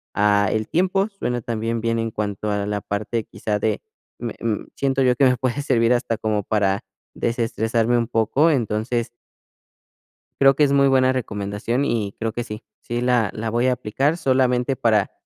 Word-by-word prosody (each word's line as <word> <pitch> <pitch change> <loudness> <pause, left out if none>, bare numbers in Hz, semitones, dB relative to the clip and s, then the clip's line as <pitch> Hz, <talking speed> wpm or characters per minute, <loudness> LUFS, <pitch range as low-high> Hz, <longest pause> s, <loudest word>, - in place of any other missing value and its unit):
a 100 -1 +3
el 110 -1 -1
tiempo, 190 +4 +1
suena 125 - -3
también 115 0 -2
bien 115 0 0
en 115 0 -2
cuanto 105 0 -3
a 100 -1 -1
la 105 -1 -2
parte, 105 +2 -3
quizás, 105 -1 -3
de 110 -2 0 0.4
me 120 -1 -5
mm, 115 -2 -2
siento 135 -1 0
yo 125 -1 +3
que 140 - +1
me 125 -1 +3
puede 130 +3 -1
servir 120 -4 +3
hasta 120 -2 -1
como 110 -2 -1
para 100 -2 0 0.3
desestresarme 115 0 0
un 115 -1 0
poco, 130 +9 +2
entonces 115 -2 -1 1.3
creo 135 0 +6
que 150 - +3
es 140 - +1
muy 140 0 +5
buena 130 -1 +4
recomendación 110 +2 -2
y 105 -5 -1
creo 115 -1 -2
que 120 - -3
sí, 105 -1 -8 0.2
sí 120 0 -3
la 120 -5 +2
la 110 +1 -3
voy 120 +3 +1
a 125 - +3
aplicar 135 +7 0
solamente 130 -2 +1
para 110 -5 +2
115 Hz, 180 wpm, -22 LUFS, 110-130 Hz, 1.3 s, creo